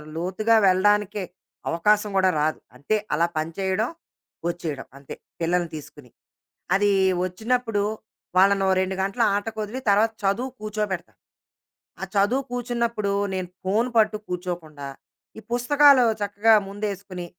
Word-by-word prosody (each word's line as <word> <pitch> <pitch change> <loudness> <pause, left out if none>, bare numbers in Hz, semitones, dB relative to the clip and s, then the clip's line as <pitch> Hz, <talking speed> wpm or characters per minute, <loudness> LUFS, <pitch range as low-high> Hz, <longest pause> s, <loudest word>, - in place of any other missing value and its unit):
లోతుగా 190 +7 +1
వెళ్ళడానికే, 205 +1 +2 0.5
అవకాశం 210 +5 +2
గూడా 190 -1 +4
రాదు. 155 +1 0 0.2
అంటే 140 +11 -1 0.2
అలా 165 +3 +2
పని 155 +1 -2
చేయడం. 195 +4 0 0.6
వచ్చేయడం 160 -6 -5
అంతే. 140 -1 -9 0.3
పిల్లల్ని 175 +1 +1
తీసుకొని. 145 -3 -11 0.7
అది 205 +1 +3 0.3
వచ్చినప్పుడు, 225 +3 -1 0.5
వాళ్ళనో 195 0 +4
2 190 0 -2
గంటల 195 +5 -2
ఆటకొదిలి 215 +3 -4
తర్వాత 215 +3 +4
చదువుకి 245 +7 -1
కూర్చోబెడతాా. 210 -4 -3 0.9
ఆ - - -3
చదువు 230 +8 +2
కూర్చున్నప్పుడు 235 -4 -1 0.2
నేను 185 -1 -3 0.2
ఫోను 220 +6 +1
పట్టు 215 -1 +3
కూర్చోకుండా. 175 -5 -5 0.5
ఈ - - -12
పుస్తకాలు 280 +2 +5 0.2
చక్కగా 205 +2 +3
ముందేసుకొని, 200 -3 -5
200 Hz, 115 wpm, -24 LUFS, 180-220 Hz, 0.9 s, పుస్తకాలు